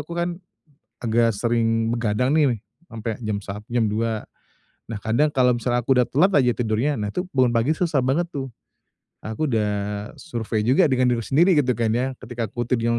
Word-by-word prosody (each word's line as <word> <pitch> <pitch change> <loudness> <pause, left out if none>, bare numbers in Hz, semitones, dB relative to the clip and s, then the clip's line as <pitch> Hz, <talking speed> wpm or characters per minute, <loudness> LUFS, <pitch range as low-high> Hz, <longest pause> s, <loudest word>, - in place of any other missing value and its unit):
aku - - -7
kan - - -2 0.8
agak 115 -1 +2
sering 115 0 +1
begadang 120 +2 0
nih, 145 -6 +3 0.3
sampe 115 0 -6
jam 110 -3 -2
sa 100 +1 -6
jam 120 -1 +1
02:00. 110 +1 -1 0.6
Nah, 115 - -4
kadang 115 +9 +1
kalau 125 -3 +3
misalnya 120 0 -1
aku 135 - +3
udah 125 - +2
telat 185 +9 +3
aja 125 -1 +3
tidurnya, 120 +5 0
nah, 105 -1 -3
itu 180 0 -3
bangun 125 -2 +4
pagi 120 +7 +1
susah 160 -6 +1
banget 135 +7 +1
tuh. 135 -2 -4 0.7
Aku 110 +8 -2
udah 110 -5 +1 0.5
survei 110 -6 -3
juga 135 +4 +4
dengan 130 -1 +2
diri 115 - -2
sendiri, 170 - +3
gitu 125 -2 -1
kan, 115 -1 +1
ya. 125 +3 0
Ketika 120 -3 -5
aku 120 0 -3
tidur 115 -1 +1
120 Hz, 185 wpm, -23 LUFS, 115-130 Hz, 0.8 s, bangun